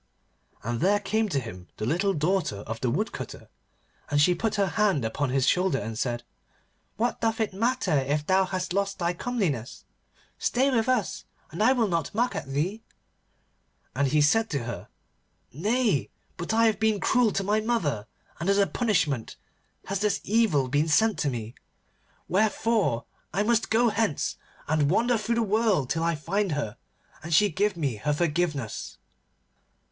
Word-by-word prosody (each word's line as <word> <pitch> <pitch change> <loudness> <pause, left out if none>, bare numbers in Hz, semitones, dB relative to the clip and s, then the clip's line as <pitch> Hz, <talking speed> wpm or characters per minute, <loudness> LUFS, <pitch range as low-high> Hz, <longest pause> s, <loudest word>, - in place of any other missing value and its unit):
And 120 +1 -2
there 200 +4 +3
came 215 +2 0
to 145 - 0
him 90 -7 -9
the 110 - -3
little 185 - +1
daughter 155 - 0
of 115 +2 -6
the 125 - +1
Woodcutter, 190 - -4 0.6
and 145 - +2
she 180 +5 +5
put 220 +4 -1
her 200 -1 +2
hand 200 - +1
upon 130 +5 -1
his 130 0 +1
shoulder 180 -5 +2
and 110 -1 -4
said, 120 +1 -2 0.7
'What 235 +2 -1
doth 225 0 0
it 220 -3 0
matter 225 -4 0
if 145 +3 -1
thou 190 +2 +3
hast 185 -1 -3
lost 200 0 -1
thy 170 0 0
comeliness? 175 - -3 0.5
Stay 265 +3 +2
with 230 -1 +1
us, 245 -8 0 0.3
and 170 - -4
I 240 +5 +5
will 235 -4 +2
not 170 +1 -2
mock 245 +2 +1
at - - -4
thee.' 165 +11 -2 1.1
And 140 +1 +2
he 150 +2 +3
said 225 +9 +3
to 140 -5 -2
her, 120 +1 -6 0.7
'Nay, 200 - +1 0.3
but 170 - -4
I 225 +1 +4
have 215 -3 +2
been 220 -2 +2
cruel 245 +1 +3
to 195 - 0
my 210 +2 +2
mother, 165 - -1 0.3
and 170 +4 -1
as 200 - +4
a 200 - +5
punishment 155 - 0 0.5
has 195 0 -2
this 205 -1 +1
evil 200 - +2
been 145 +5 +1
sent 220 +8 +3
to 145 - +1
me. 115 -3 -5 0.7
Wherefore 215 - +1 0.3
I 195 +5 +1
must 230 +1 +1
go 235 +2 +4
hence, 210 -8 -1 0.3
and 150 -2 +2
wander 240 +7 +3
through 230 +2 -1
the 230 - +2
world 210 - +1
till 160 +3 0
I 170 0 +1
find 185 +4 -1
her, 140 -8 -3 0.4
and 165 - -7
she 205 +6 +5
give 200 +3 0
me 140 -9 -1
her 150 +8 0
forgiveness. 150 -7 -2
185 Hz, 170 wpm, -27 LUFS, 145-220 Hz, 1.1 s, she